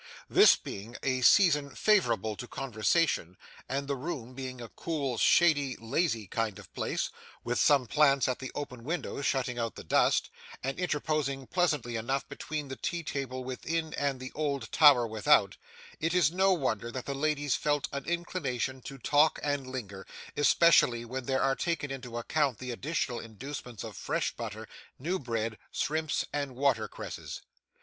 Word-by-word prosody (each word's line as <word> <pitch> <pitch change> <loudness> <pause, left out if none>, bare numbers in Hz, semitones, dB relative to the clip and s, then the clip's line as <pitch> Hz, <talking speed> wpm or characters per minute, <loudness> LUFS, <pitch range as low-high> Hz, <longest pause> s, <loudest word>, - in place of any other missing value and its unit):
This - - +7
being 110 +5 -8
a 130 -1 0
season 150 -1 +5
favourable 115 - +2
to 125 - -7
conversation, 120 - 0 0.3
and 140 +1 -2
the 140 - 0
room 130 -3 -5
being 130 -1 -6
a 120 - -7
cool, 140 -8 -3
shady, 145 -6 +4
lazy 115 -1 0
kind 110 +1 -2
of - - -14
place, - - -2 0.3
with 120 0 -1
some 140 -4 +4
plants 140 +2 +4
at 130 - -1
the 130 - -6
open 125 -5 -6
window 160 0 -3
shutting 130 -3 0
out 115 -1 -2
the - - -8
dust, - - +2 0.3
and 135 +5 -3
interposing 150 -5 -1
pleasantly 150 -9 0
enough 130 +5 -2
between 150 +1 -5
the 135 - -5
tea 170 -2 -3
table 130 -4 -4
within 160 +5 -3
and 140 -2 -1
the 130 0 -7
old 145 -3 -2
Tower 140 -6 +7
without, 110 -2 +3 0.4
it 165 +2 0
is 165 -5 +4
no 190 +2 +3
wonder 120 - 0
that 130 0 -5
the 140 - -3
ladies 145 -1 0
felt 145 -1 0
an 140 -1 -4
inclination 140 -7 -2
to 135 - -8
talk 145 +4 +3
and 145 -2 -1
linger, 105 -7 -7 0.3
especially 145 -6 +4
when 130 +1 -5
there 130 0 +1
are 135 0 +2
taken 160 -4 -2
into 125 -3 -6
account 135 0 0
the 125 +1 -5
additional 125 -1 -2
inducements 120 -1 -7
of - - -7
fresh - - -2
butter, - - -6 0.3
new 175 +8 -2
bread, 115 -3 -3
shrimps, 155 0 -1
and 140 -3 -2
watercresses. 125 -6 -2
135 Hz, 160 wpm, -30 LUFS, 120-150 Hz, 0.4 s, This